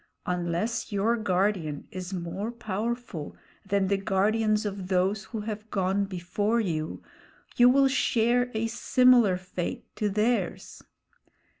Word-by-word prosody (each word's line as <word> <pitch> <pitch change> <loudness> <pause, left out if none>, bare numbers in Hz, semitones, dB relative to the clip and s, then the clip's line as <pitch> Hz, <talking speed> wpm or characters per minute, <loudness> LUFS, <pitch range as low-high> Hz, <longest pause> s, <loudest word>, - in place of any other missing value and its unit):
Unless 180 +7 -2
your 205 +3 +2
guardian 185 -7 -1
is 185 0 -6
more 190 +4 -4
powerful 230 -6 -4 0.3
than 200 -1 +1
the 200 +1 +2
guardians 215 +3 +1
of 195 -2 -4
those 190 +2 +1
who 225 -3 -5
have 215 0 -6
gone 195 0 0
before 195 +4 -1
you, 160 -7 -3 0.5
you 245 0 +7
will 270 +1 +5
share 245 -2 +2
a 220 +1 0
similar 240 -3 +4
fate 185 -1 -5
to 210 - 0
theirs. 215 +4 -1
205 Hz, 125 wpm, -27 LUFS, 185-230 Hz, 0.5 s, you